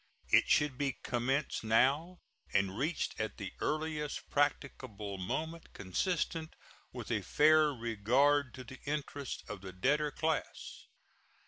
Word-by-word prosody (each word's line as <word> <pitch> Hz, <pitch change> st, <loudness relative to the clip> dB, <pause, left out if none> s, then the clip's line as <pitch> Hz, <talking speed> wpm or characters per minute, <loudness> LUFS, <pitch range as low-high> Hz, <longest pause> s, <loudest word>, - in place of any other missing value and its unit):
It -, -, +5 dB
should 150 Hz, -3 st, +3 dB
be 140 Hz, -2 st, +1 dB
commenced 130 Hz, +4 st, 0 dB
now 140 Hz, +11 st, +2 dB, 0.3 s
and 100 Hz, -1 st, +1 dB
reached 150 Hz, +8 st, -2 dB
at 110 Hz, 0 st, -3 dB
the 100 Hz, -3 st, -6 dB
earliest 155 Hz, -1 st, -2 dB
practicable 125 Hz, -8 st, -1 dB
moment 160 Hz, -, -4 dB
consistent 160 Hz, -, -2 dB, 0.4 s
with -, -, -6 dB
a -, -, +1 dB
fair 155 Hz, 0 st, +5 dB
regard 125 Hz, +4 st, +2 dB
to 130 Hz, -, -8 dB
the 130 Hz, +1 st, -11 dB
interests 145 Hz, -2 st, -3 dB
of 105 Hz, -3 st, -7 dB
the 95 Hz, -1 st, -7 dB
debtor 145 Hz, +11 st, +2 dB
class. 160 Hz, +1 st, -3 dB
140 Hz, 125 wpm, -33 LUFS, 115-150 Hz, 0.4 s, It